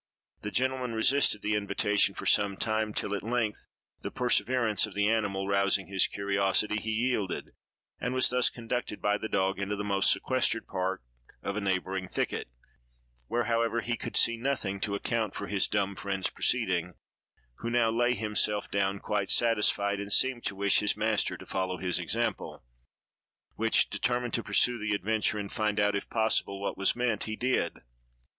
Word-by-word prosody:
The 105 - -4
gentleman 130 +1 -1
resisted 110 -1 +2
the 105 - 0
invitation 105 -1 +1
for - - -7
some 100 -2 +3
time, 110 -1 -1
till 105 -1 -2
at 100 - -2
length, 115 -2 -2 0.3
the - - -4
perseverance 125 -4 +1
of 105 - -12
the 105 0 +2
animal 100 -3 0
rousing 100 -1 +2
his 95 -1 +2
curiosity, 100 +1 0
he 110 +1 -4
yielded, 110 -3 -1 0.5
and 125 - -2
was 130 -1 +3
thus 125 0 +3
conducted 120 -2 -4
by 105 0 +1
the 110 - -5
dog 95 0 0
into 100 +1 -2
the 105 - -4
most 100 -1 +3
sequestered 130 -3 +1
part 95 -4 -3 0.4
of 100 - -3
a 105 - -2
neighboring 95 -1 -2
thicket, - - -3 0.8
where, 120 - 0
however, 115 0 0
he 120 0 -2
could - - -3
see 115 0 +4
nothing 115 -6 -2
to 100 0 -2
account 110 0 -2
for 100 - -4
his 100 -1 +1
dumb 100 -1 -1
friend's 95 -1 -2
proceeding, 90 -8 0 0.6
who 115 - -3
now 120 -1 +2
lay 120 +2 +2
himself 105 -1 0
down, 100 0 0
quite 100 -1 -2
satisfied, 105 -3 +2
and 100 0 -6
seemed 130 +2 +3
to 100 - -2
wish 100 0 +3
his 105 - +1
master 110 -1 +1
to - - -12
follow 95 -1 -2
his 90 -1 0
example, - - -3 0.9
which, 115 +1 +2
determined 120 -1 -1
to 115 - +1
pursue 115 +3 +2
the 105 -1 -1
adventure 110 +1 0
and 100 -1 -5
find 105 -1 0
out, 105 0 +2
if 100 - -4
possible, 110 -3 0
what 100 - -3
was 100 0 +2
meant, 120 -4 -1
he 110 - -4
did. 120 -8 -1
105 Hz, 175 wpm, -29 LUFS, 100-115 Hz, 0.9 s, see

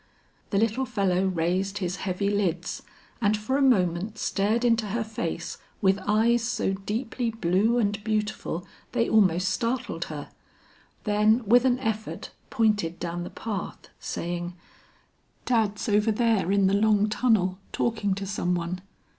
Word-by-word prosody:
The 200 - 0
little 225 +5 +1
fellow 195 -3 +1
raised 185 +3 0
his 185 -1 -2
heavy 195 +2 -1
lids 180 -4 -1 0.4
and 210 -1 +3
for 215 +6 -2
a 285 - +2
moment 200 -4 +2
stared 215 +4 0
into 230 -2 +2
her 225 +3 -1
face 175 -6 -4 0.2
with 195 0 +3
eyes 225 +3 +3
so 230 -4 0
deeply 225 +5 -2
blue 215 +2 +1
and 205 -2 0
beautiful 215 -5 -2 0.3
they 235 -1 +2
almost 185 -4 +3
startled 230 -6 -2
her, 145 -2 -7 0.7
then 215 +3 +3
with 245 +4 +5
an 250 -1 +3
effort 220 -4 -4 0.2
pointed 210 -9 +1
down 175 0 -3
the - - -6
path, 210 -5 -6
saying, 175 +1 -4 0.9
"Dad's 220 -4 +1
over 210 +1 +3
there 220 -4 +2
in 200 -1 +3
the 190 - +3
long 210 0 +3
tunnel 210 -5 +1
talking 210 -4 0
to 195 0 -4
some 180 -2 -1
one. 175 +1 -3
205 Hz, 145 wpm, -26 LUFS, 185-225 Hz, 0.9 s, with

